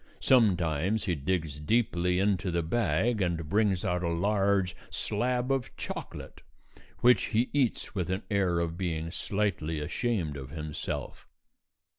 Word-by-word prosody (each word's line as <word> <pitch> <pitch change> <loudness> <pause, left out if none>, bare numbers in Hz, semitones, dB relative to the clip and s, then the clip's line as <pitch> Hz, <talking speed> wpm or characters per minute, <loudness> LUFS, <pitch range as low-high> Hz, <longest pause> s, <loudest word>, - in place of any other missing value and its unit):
Sometimes 95 - +3
he 90 - 0
digs 80 -1 -2
deeply 90 -1 +1
into 95 -1 +1
the 85 -1 0
bag 110 +4 +1
and 85 -3 -1
brings 100 0 +2
out 90 0 0
a 85 - 0
large 100 +1 +1
slab 125 +4 -1
of 135 -2 0
chocolate, - - -7 0.6
which 125 0 +5
he 120 +2 +1
eats 130 -6 0
with 90 -5 -2
an 95 +3 -1
air 95 -4 +2
of 85 +1 -2
being 85 -3 -2
slightly 90 -6 -1
ashamed 85 - -1
of 65 -1 -7
himself. 75 0 -5
90 Hz, 135 wpm, -29 LUFS, 80-105 Hz, 0.6 s, which